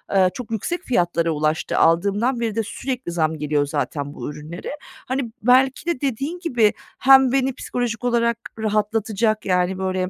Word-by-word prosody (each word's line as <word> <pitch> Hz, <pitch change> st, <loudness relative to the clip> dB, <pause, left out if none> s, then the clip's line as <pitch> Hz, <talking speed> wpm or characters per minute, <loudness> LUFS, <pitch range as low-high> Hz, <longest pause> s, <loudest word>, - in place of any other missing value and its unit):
ııı, 190 Hz, -1 st, +5 dB
çok 250 Hz, -3 st, -8 dB
yüksek 340 Hz, -, -2 dB
fiyatlara 175 Hz, -, +1 dB
ulaştı. 155 Hz, +1 st, -1 dB
Aldığımdan 200 Hz, +9 st, +2 dB
beri 225 Hz, -3 st, -2 dB
de 225 Hz, -, 0 dB
sürekli 250 Hz, -2 st, -4 dB
zam 160 Hz, -2 st, 0 dB
geliyor 150 Hz, -1 st, 0 dB
zaten 145 Hz, 0 st, -3 dB
bu -, -, -6 dB
ürünlere. 155 Hz, +4 st, -7 dB, 0.4 s
Hani, 260 Hz, -2 st, -2 dB
belki 260 Hz, +4 st, +4 dB
de 340 Hz, -7 st, -1 dB
dediğin 280 Hz, +6 st, -2 dB
gibi 245 Hz, -, +2 dB, 0.3 s
hem 265 Hz, -1 st, +6 dB
beni 265 Hz, 0 st, +1 dB
psikolojik 245 Hz, -2 st, -3 dB
olarak 235 Hz, -1 st, +1 dB, 0.2 s
rahatlatacak, 215 Hz, 0 st, 0 dB
yani, 180 Hz, 0 st, +1 dB
böyle, 185 Hz, -1 st, -1 dB
220 Hz, 155 wpm, -22 LUFS, 175-250 Hz, 0.4 s, hem